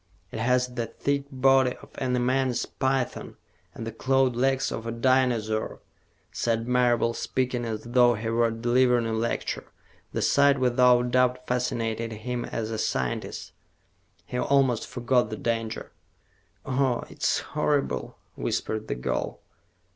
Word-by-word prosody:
"It - - -5
has 125 +2 +1
the 120 -2 -2
thick 140 +4 -2
body 130 -1 +3
of - - -15
an 125 -1 0
immense 130 0 +1
python 130 -1 -2 0.4
and 115 - -6
the 115 - -4
clawed 130 +2 +1
legs 135 +2 +1
of 115 +1 -5
a - - -2
dinosaur," 115 -3 +1 0.5
said 115 0 -1
Marable, 120 -2 +2
speaking 125 0 -2
as 110 -2 -4
though 120 0 +4
he 110 +1 -4
were 115 0 +2
delivering 120 +1 +2
a 115 - -1
lecture. 115 +1 -2 0.5
The - - -2
sight, 140 -1 +4
without 125 -1 +4
doubt, 125 0 +2
fascinated 115 -2 -1
him 120 +3 -4
as 110 -1 -4
a 110 - -3
scientist. 65 -2 -2 0.7
He 125 - -4
almost 130 -5 +2
forgot 125 -2 +1
the 110 - -5
danger. 115 -1 -3 0.7
"Oh, 130 -2 +1
it's - - 0 0.2
horrible," 150 -1 0 0.2
whispered 110 0 -2
the - - -2
girl. 60 - -3
125 Hz, 140 wpm, -26 LUFS, 115-130 Hz, 0.7 s, though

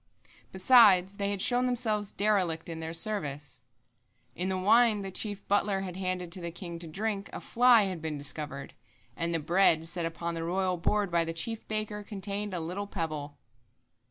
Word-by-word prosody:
Besides, 190 -2 +5
they 200 0 0
had 200 -2 -2
shown 250 0 +2
themselves 220 -5 0
derelict 185 -6 0
in 165 -1 -5
their 160 0 -4
service. 150 - -3 0.7
In 185 +2 -2
the 190 - -1
wine 215 +2 +4
the 195 - -5
chief 205 +1 -4
butler 200 -1 +1
had 185 -2 -6
handed 185 -2 -3
to 185 +1 0
the 170 - -4
king 170 0 -8
to 170 - -7
drink, 200 +4 -3
a - - -6
fly 240 -2 +5
had 185 -4 -3
been 155 -2 -3
discovered, 140 -1 -4 0.4
and 170 0 -2
the 165 - +1
bread 165 0 +3
set 170 0 -2
upon 170 +1 -4
the 165 0 -4
royal 185 +1 0
board 200 +2 0
by 170 -1 +2
the 165 0 -4
chief 225 +7 -4
baker 215 -1 -3
contained 205 0 -4
a - - -2
little 180 +5 -4
pebble." 155 -6 -4
185 Hz, 185 wpm, -29 LUFS, 165-205 Hz, 0.7 s, Besides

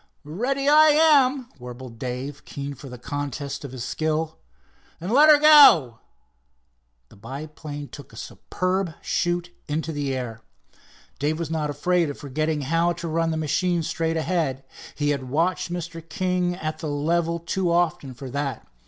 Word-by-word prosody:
"Ready 250 - -2
I 305 +1 +7
am," 285 -4 +4
warbled 125 -1 -9
Dave, 130 +3 -5
keen 140 0 -6
for 135 0 -11
the 125 - -8
contest 145 +2 -5
of 140 - -7
his 130 -2 -6
skill. 155 +3 -2 0.6
"Then 175 +5 -4
let 295 +5 +7
her 300 - +9
go." 285 - +7 1.1
The - - -17
biplane 145 +5 -8
took 145 - -12
a - - -15
superb 185 -2 -3
shoot 175 0 -1 0.2
into 160 +2 -2
the 145 -3 -2
air. 115 -3 -5 0.8
Dave 150 +3 0
was 165 -2 -4
not 155 -2 -1
afraid 170 +3 +1
of 145 - -6
forgetting 150 +2 -2
how 165 +5 +1
to 170 - -6
run 165 +1 0
the 160 - -1
machine 170 +3 0
straight 165 +1 -1
ahead. 160 -5 -1 0.3
He 145 -1 0
had 130 -3 -3
watched 170 +5 0
Mr. 170 -1 -5
King 180 0 0
at 155 -2 -4
the 155 - -4
level 165 +3 0
too 170 +1 -1
often 165 -6 0
for 130 +1 -8
that. 140 -3 -3
155 Hz, 160 wpm, -24 LUFS, 140-175 Hz, 1.1 s, her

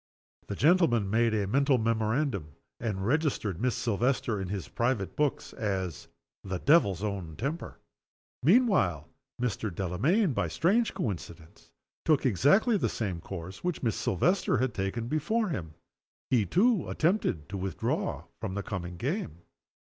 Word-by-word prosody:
The 100 - -4
gentleman 135 - +3
made 115 0 +3
a 105 -2 +1
mental 135 +6 +3
memorandum, 110 - 0 0.3
and 100 -5 -2
registered 125 - 0
Miss 125 -1 +1
Silvester 115 -1 0
in 95 - -3
his 95 -2 -4
private 115 -5 -1
books 150 -2 -1
as 95 -7 -3 0.4
"the 95 -2 -3
devil's 100 - +3
own 95 -7 -3
temper." 145 - -4 0.6
Meanwhile 160 - +3 0.3
Mr. 115 -3 -1
Delamayn, 130 - +1
by - - 0
a - - -7
strange 215 +8 +2
coincidence, 85 -6 -6 0.3
took 155 -4 +3
exactly 145 - +4
the - - 0
same 95 -7 -3
course 95 +1 -8
which 180 -5 -2
Miss 115 -4 +1
Silvester 170 - +1
had 130 -3 0
taken 100 +5 -2
before 185 - 0
him. 80 - -5 0.6
He, 115 -6 +3
too, 215 - +2
attempted 160 - 0
to 100 - -4
withdraw 95 -2 -2 0.2
from 95 - -3
the 100 - -2
coming 90 -3 -5
game. 120 - -3
115 Hz, 140 wpm, -29 LUFS, 95-150 Hz, 0.6 s, exactly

